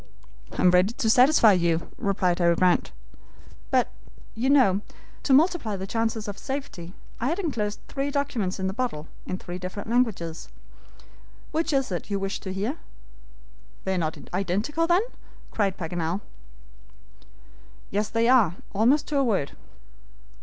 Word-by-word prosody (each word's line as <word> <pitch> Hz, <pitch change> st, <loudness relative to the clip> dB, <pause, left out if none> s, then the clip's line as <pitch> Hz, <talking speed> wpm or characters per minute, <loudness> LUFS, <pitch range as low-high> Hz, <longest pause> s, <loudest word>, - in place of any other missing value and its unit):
"I -, -, -2 dB
am 180 Hz, -, +7 dB
ready 180 Hz, +5 st, +4 dB
to 225 Hz, -, 0 dB
satisfy 250 Hz, -2 st, +6 dB
you," 170 Hz, -2 st, +1 dB
replied 185 Hz, -3 st, +1 dB
Harry 170 Hz, -1 st, +4 dB
Grant; 180 Hz, -, +2 dB, 0.8 s
"but, -, -, +2 dB, 0.4 s
you 245 Hz, +4 st, 0 dB
know, 245 Hz, -9 st, +5 dB, 0.4 s
to -, -, -1 dB
multiply 285 Hz, -, +3 dB
the 190 Hz, 0 st, -5 dB
chances 225 Hz, +1 st, -1 dB
of 205 Hz, -, -6 dB
safety, 265 Hz, -11 st, -6 dB, 0.2 s
I 240 Hz, -, -1 dB
had 330 Hz, +5 st, 0 dB
inclosed 230 Hz, -, -2 dB
three 275 Hz, 0 st, -2 dB
documents 250 Hz, -10 st, -1 dB
in 190 Hz, -, -2 dB
the 190 Hz, -, -1 dB
bottle, 225 Hz, -10 st, -3 dB, 0.2 s
in 185 Hz, -, -2 dB
three 180 Hz, 0 st, -7 dB
different 185 Hz, +4 st, -6 dB
languages. 210 Hz, -10 st, 0 dB, 1.0 s
Which 325 Hz, +1 st, 0 dB
is 270 Hz, -6 st, +1 dB
it 175 Hz, +2 st, -4 dB
you 200 Hz, -, 0 dB
wish 195 Hz, +1 st, -3 dB
to 190 Hz, -, -6 dB
hear?" 210 Hz, -, -2 dB, 1.1 s
"They 190 Hz, -, -1 dB
are -, -, 0 dB
not 160 Hz, -2 st, -2 dB, 0.2 s
identical, 205 Hz, -, 0 dB
then?" 350 Hz, +4 st, +4 dB, 0.5 s
cried 195 Hz, -3 st, 0 dB
Paganel. 170 Hz, +2 st, -2 dB, 1.7 s
"Yes, 210 Hz, +1 st, 0 dB
they 230 Hz, 0 st, +1 dB
are, 230 Hz, -10 st, +5 dB, 0.2 s
almost 240 Hz, +9 st, +3 dB
to 295 Hz, -, 0 dB
a -, -, +3 dB
word." 195 Hz, -, 0 dB
210 Hz, 150 wpm, -26 LUFS, 185-260 Hz, 1.7 s, am